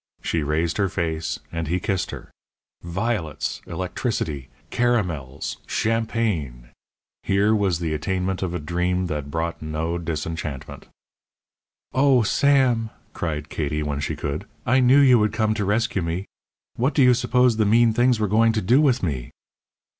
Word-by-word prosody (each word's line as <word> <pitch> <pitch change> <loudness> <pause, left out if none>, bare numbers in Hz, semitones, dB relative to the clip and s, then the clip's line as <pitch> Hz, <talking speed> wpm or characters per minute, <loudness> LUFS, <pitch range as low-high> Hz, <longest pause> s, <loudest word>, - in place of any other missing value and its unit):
She 80 - 0
raised 80 +3 0
her 100 -2 +1
face, 80 -3 -2
and 85 -1 -3
he 90 +4 0
kissed 95 0 -1
her - - -9 0.5
violets! 85 -4 -3
electricity! 80 - -3 0.2
caramels! 90 - -1
champagne! 110 - -1 0.5
Here 100 +2 +2
was 100 -5 +1
the 80 -2 -2
attainment 95 +4 -2
of 90 -2 -2
a - - -2
dream 90 +3 -1
that 75 -4 -4
brought 80 +3 -3
no 80 +2 -2
disenchantment. 80 -3 -5 1.1
"Oh, 130 -2 +4
Sam," 125 -2 +3 0.2
cried 75 -1 -4
Katie, 75 0 -2
when 75 -1 -2
she 70 - -2
could, 75 +8 -4 0.2
"I 130 +1 +3
knew 130 +2 +5
you 130 -4 +6
would 105 -1 +1
come 110 0 +1
to 105 -2 -2
rescue 105 0 0
me. 85 +3 -3 0.5
What 130 +5 +1
do 140 - +5
you 125 0 +6
suppose 125 -1 +2
the 110 - +3
mean 115 +1 +4
things 120 0 +3
were 105 - +1
going 110 +3 +3
to 110 - 0
do 125 +10 +4
with 130 -6 +2
me?" 65 -8 -2
95 Hz, 155 wpm, -23 LUFS, 80-115 Hz, 1.1 s, you